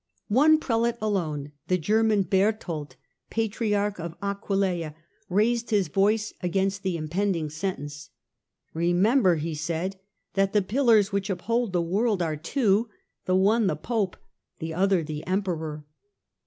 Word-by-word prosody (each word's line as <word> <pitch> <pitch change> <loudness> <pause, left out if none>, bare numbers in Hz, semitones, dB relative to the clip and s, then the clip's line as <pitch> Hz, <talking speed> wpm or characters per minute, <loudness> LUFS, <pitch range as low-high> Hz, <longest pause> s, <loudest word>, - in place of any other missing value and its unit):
One 300 +8 +6
Prelate 235 -5 0
alone, 160 -9 -2 0.2
the 185 - +2
German 210 +4 +2
Berthold, 185 -7 -1 0.3
Patriarch 210 -2 -1
of 170 0 -6
Aquilea, 195 -5 -1 0.3
raised 230 +5 +1
his 200 -7 +2
voice 210 +5 +1
against 195 +2 0
the 185 -3 -1
impending 165 0 -1
sentence. 150 -3 -5 0.3
" - - -60 0.3
Remember," 180 +5 +3
he 160 +1 -3
said, 170 +5 -3 0.2
" - - -52
that 195 0 +1
the 210 -2 +3
pillars 220 -2 +3
which 200 0 -1
uphold 230 +4 -1
the 175 -2 +1
world 200 +2 +1
are 160 -2 -1
two: 210 - +1 0.4
the 185 - +2
one 205 +3 +3
the - - +1
Pope, 215 -6 -2 0.4
the 160 -1 -5
other 190 0 +2
the 150 -1 -5
Emperor." 165 -6 -2
195 Hz, 140 wpm, -26 LUFS, 170-215 Hz, 0.4 s, One